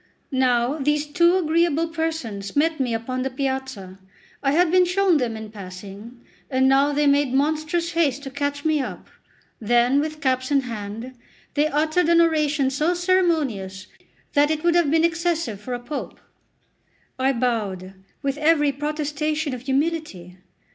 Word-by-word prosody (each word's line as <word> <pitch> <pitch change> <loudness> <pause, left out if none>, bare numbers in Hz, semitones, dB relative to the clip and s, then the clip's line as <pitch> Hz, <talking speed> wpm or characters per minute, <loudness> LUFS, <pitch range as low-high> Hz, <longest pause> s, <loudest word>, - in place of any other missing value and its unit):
Now 255 +1 +1
these 295 +2 +1
two 340 +4 +3
agreeable 330 -1 +1
persons 320 -12 -4
met 315 +2 +1
me 255 -3 0
upon 255 +3 -3
the 265 - -1
piazza: 265 -8 -4 0.4
I 275 - +1
had 345 +1 +3
been 365 0 +5
shown 360 -1 +2
them 235 -5 -2
in 220 -1 -8
passing, 200 +4 -10 0.3
and 260 0 +2
now 275 +2 +4
they 295 +1 +1
made 280 -2 +2
monstrous 310 +4 0
haste 290 -5 0
to 270 - -7
catch 285 +1 -3
me 310 -2 +2
up; - - -7 0.5
then, 240 +4 +3
with 310 +1 -3
caps 255 -3 0
in 280 -2 +3
hand, 225 +1 -7 0.4
they 295 +1 +2
uttered 310 +3 +1
an 340 0 +5
oration 305 -4 +2
so 305 +6 +1
ceremonious, 315 - 0 0.5
that 290 0 +4
it 310 0 -1
would 345 0 +3
have 345 -4 +3
been 325 +2 +3
excessive 335 - -1
for 250 +3 -4
a - - -5
Pope. 275 +5 -6 1.0
I 265 +1 +3
bowed, 215 -7 -2 0.3
with 280 +1 -2
every 300 -2 +3
protestation 300 +1 -2
of 250 - -6
humility. 270 - -2
285 Hz, 155 wpm, -23 LUFS, 245-315 Hz, 1.0 s, been